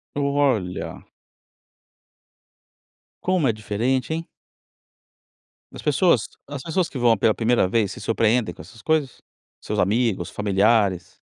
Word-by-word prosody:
Olha! 140 -10 -1 2.2
Como 180 -5 +2
é 120 - +3
diferente, 115 +7 -1
hein. 165 +1 -3 1.5
As - - -7
pessoas 150 - +2 0.2
as 145 -2 -6
pessoas 170 +1 -1
que 135 - -7
vão 120 -2 +4
pela 110 +2 +2
primeira 115 -3 +2
vez 100 +1 0
se - - -10
surpreendem 110 -2 +1
com - - -16
essas 105 +8 -13
coisas? 155 -4 -1 0.4
Seus - - -4
amigos, 105 -3 +1
familiares? 100 -2 +1
115 Hz, 115 wpm, -23 LUFS, 105-140 Hz, 2.2 s, vão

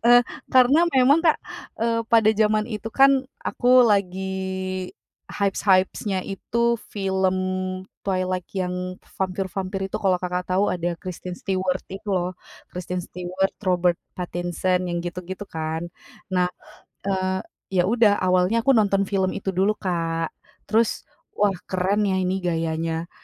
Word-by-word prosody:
Eee, 245 +1 +8 0.3
karena 260 +4 +6 0.2
memang 270 +5 +5
Kak, 325 -2 +4 0.4
eee, 230 0 +1
pada 225 -2 +5
zaman 215 0 +2
itu 225 0 -4
kan 270 -1 +5 0.2
aku 250 0 +5
lagi 190 -2 -1 0.4
hypes-hypes-nya 195 -1 +1
itu 235 +4 0
film 190 -2 0 0.6
Twilight 185 -2 -1
yang 180 0 -2 0.2
vampir-vampir 190 +1 -2
itu - - 0
kalau 190 -2 +3
Kakak 180 0 -3
tahu 190 +3 +2
ada 175 -1 -2
Kristen 180 0 -7
Stewart 185 -1 -1
itu 205 +2 -8
loh. 180 -2 0 0.4
Kristen 180 0 -4
Stewart, 180 +2 -2
Robert 180 -3 +1 0.2
Pattinson, 180 +1 -1
yang 175 - -2
gitu-gitu 180 +3 -5
kan. 160 -2 -4 0.5
Nah, 180 -1 +3 0.6
eee, 190 -1 -1 0.3
ya 180 -1 +4
udah 225 -3 +4
awalnya 185 +5 +3
aku 275 - +5
nonton 200 -4 +3
film 190 -1 0
itu 195 -1 -3
dulu 195 +4 +2
Kak, 165 -4 -2 0.4
terus 225 +1 +2 0.3
wah 205 -1 +3 0.2
keren 195 +3 +1
ya 190 -1 +1
ini 185 +1 0
gayanya, 165 -1 -2
190 Hz, 130 wpm, -24 LUFS, 180-205 Hz, 0.6 s, Eee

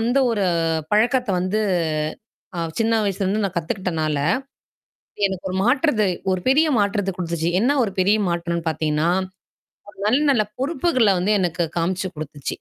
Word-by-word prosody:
அந்த 245 +4 +1
ஒரு 205 -4 0 0.5
பழக்கத்த 245 +3 +2
வந்து 195 +4 0 1.0
ஆ - - -4 0.2
சின்ன 225 0 +2
வயசுலருந்து 200 +1 0
நான் 195 - -3
கத்துக்கிட்டனால, 160 -3 -2 1.1
எனக்கு 190 -1 -3
ஒரு - - -3
மாற்றத்த 255 -3 +2 0.3
ஒரு 185 -1 -1
பெரிய 310 +4 +4
மாற்றத்த 200 -1 0
குடுத்துச்சு. 170 -1 -2
என்ன 250 +6 +3
ஒரு 200 - -2
பெரிய 200 +3 +4
மாற்றன்னு 170 -1 -2
பார்த்தீங்கன்னா, 155 +1 0 0.8
ஒரு 205 - -15
நல்ல 250 +7 +3
நல்ல 225 -6 +3
பொறுப்புகள 265 - +2
வந்து 210 +4 +2
எனக்கு 170 -1 0
காமிச்சு 185 +2 -1
குடுத்துச்சு. 150 -2 -8
195 Hz, 140 wpm, -22 LUFS, 170-225 Hz, 1.1 s, பெரிய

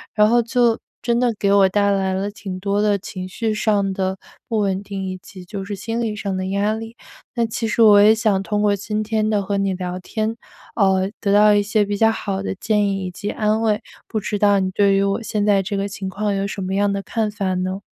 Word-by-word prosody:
然 210 0 +5
后 240 0 +4
就 235 -1 +2 0.2
真 235 0 +1
的 245 -1 +2
给 200 -1 +1
我 195 -1 +5
带 200 +1 +2
来 190 -1 0
了， 200 +2 -2
挺 190 -3 -7
多 200 +1 0
的 205 -1 +2
情 185 -1 -7
绪 220 +3 -2
上 205 -2 +1
的 190 0 -2 0.3
不 225 - -1
稳 195 -1 0
定， 195 -1 -6
以 185 0 -4
及 185 -2 -12
就 195 +1 -6
是 200 0 -5
心 225 +4 -3
理 215 -2 -2
上 200 -2 -3
的 185 0 -3
压 200 +2 0
力。 225 +1 -7 0.4
那 235 -1 +1
其 225 0 -3
实 230 - 0
我 205 -2 +8
也 215 +2 +6
想 215 -4 +1
通 210 0 -1
过 205 -1 +3
今 210 +2 -3
天 215 0 0
的 205 -2 +1
和 200 +1 -2
你 195 -1 0
聊 180 0 -4
天， 220 +4 -3 0.4
呃， 190 -1 +2
得 200 - 0
到 210 0 +6
一 205 - +4
些 210 0 +1
比 205 0 -2
较 225 +1 +4
好 195 -3 -3
的 195 - -3
建 210 0 +1
议 195 -1 -2
以 180 - -4
及 205 +3 -5
安 215 +1 0
慰， 215 -2 +1 0.3
不 215 - -2
知 205 0 -3
道 205 -1 +4
你 185 0 -1
对 200 0 +3
于 195 - +2
我 200 +3 0
现 210 -1 -1
在 200 -2 +4
这 200 +1 -3
个 200 +1 -1
情 195 -1 -6
况， 205 +1 -2
有 195 0 -1
什 195 - -5
么 190 +1 -3
样 200 0 +2
的 200 0 -3
看 220 -2 -1
法 200 -3 -2
呢？ 185 +2 -2
205 Hz, 270 characters per minute, -21 LUFS, 195-215 Hz, 0.4 s, 我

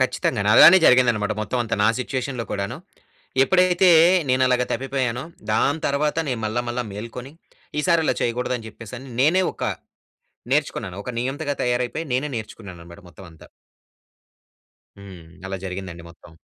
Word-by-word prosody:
ఖచ్చితంగాను. - - 0
అలానే 170 +4 +9
జరిగింది 125 -1 +5
అన్నమాట, 105 0 -2
మొత్తం 115 +4 -3
అంతా, 115 0 -2
నా - - +5
సిట్యుయేషన్‌లో 130 -1 -3
కూడాను. 100 +5 -3 0.7
ఎప్పుడైతే 180 +2 +3 0.4
నేను 130 +1 +2
అలాగ 125 -1 +2
తప్పిపోయానో, 130 0 -2 0.3
దాని 145 +8 +1
తర్వాత 150 +2 0
నేను 125 -3 -2
మళ్ళా 120 +3 -2
మళ్ళా 120 0 -3
మేల్కొని. 115 +6 -8 0.5
ఈసారి 170 +1 +2
ఇలా - - +2
చేయకూడదు 125 +2 -1
అని 110 - -11
చెప్పేసి 115 +2 -10 0.2
నేనే 170 +7 +4
ఒక - - -6 0.9
నేర్చుకున్నాను. 115 -10 -1
ఒక 125 - -4
నియంతగా 140 +3 -3
తయారైపోయి, 125 +6 -1
నేనే 140 +4 -1
నేర్చుకున్నాను 105 -5 -9
అన్నమాట, 85 +3 -13
మొత్తం 95 +2 -14
అంతా. 80 - -16 1.5
హ్మ్. 95 -4 -12 0.2
అలా 95 - -4
జరిగిందండి 90 -2 -7
మొత్తం. 85 0 -18
125 Hz, 140 wpm, -22 LUFS, 105-140 Hz, 1.5 s, అలానే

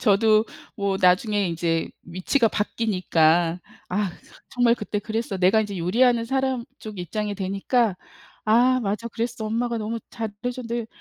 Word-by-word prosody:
저도 215 0 +4 0.3
뭐 200 -2 0
나중에 195 +2 +3
이제 165 0 -1
위치가 185 +8 +1
바뀌니까 175 -6 +1 0.3
'아 195 0 0
그거 - - -18
정말 240 -1 +3
그때 210 -2 -3
그랬어.' 215 -1 -3
내가 190 +4 +4
이제 205 -2 -3
요리하는 230 +7 +3
사람 265 -1 -1
쪽 215 -3 -9
입장이 205 +4 -3
되니까 195 +2 0 0.5
'아 245 +4 +4
맞아. 210 +2 -2
그랬어. 235 0 -3
엄마가 235 +1 -1
너무 225 +1 -3
잘해 225 -2 -4 0.2
줬는데 235 -2 -4
215 Hz, 315 characters per minute, -24 LUFS, 190-235 Hz, 0.5 s, 저도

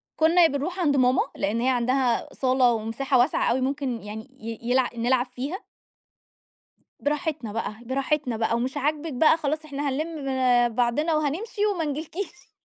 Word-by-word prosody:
كنُّا 330 +2 +5
بنروح 320 +6 -3
عند 290 -5 +2
ماما 255 0 +4
لإن 215 +4 -1
هي 255 - +2
عندها 250 -1 +1
صالة 255 -1 +3
ومساحة 230 +5 0
واسعة 245 -1 +2
أوي 260 - +1
ممكن 265 -3 -2
يعني 220 +4 -8
ي 225 0 -6
يلع 255 -1 +3
نلعب 245 +2 +2
فيها. 270 - -6 1.4
براحتنا 290 -5 -2
بقى، 225 -2 -3
براحتنا 265 -1 -1
بقى 225 +1 +1
ومش 255 +4 -2
عاجبِك 300 +2 -1
بقى، 315 +5 +4
خلاص 310 0 -2
احنا 285 -1 -3
هَنلِم 305 +2 -3 0.5
بعضنا 270 +7 +1
وهنمشي 360 +8 -1
وما 330 -3 -1
نجلكيش. 320 +5 -5
275 Hz, 145 wpm, -25 LUFS, 245-310 Hz, 1.4 s, كنُّا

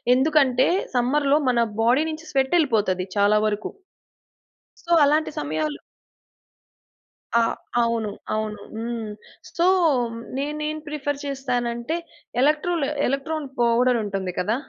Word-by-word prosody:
ఎందుకంటే 265 -2 +3 0.3
సమ్మర్‌లో 280 +4 +3
మన 235 -2 +3 0.2
బాడీ 250 +6 +4
నుంచి 315 +1 -8
స్వెట్ 270 +2 +1
యేళ్ళిపోతది 210 - +1
చాలా 205 +1 +4
వరకు. 210 0 -3 1.2
సో, 345 - -4
అలాంటి 305 +2 +2
సమయాలు 150 -1 -2 1.6
ఆ! - - +5 0.4
అవును. 230 -2 0 0.2
అవును. 215 -1 -3
హ్మ్. 230 -1 -4 0.5
సో, 340 - +2 0.7
నేనేం 300 +2 -2
ప్రిఫర్ 290 -1 -3
చేస్తానంటే, 250 0 -2 0.5
ఎలక్‌ట్రోల్ 305 +2 +2 0.2
ఎలక్ట్రాన్ 285 +3 -2
పౌడర్ 240 +1 +3
ఉంటుంది 195 -3 -3
కదా? 210 +5 +1
250 Hz, 100 wpm, -23 LUFS, 220-295 Hz, 1.6 s, ఆ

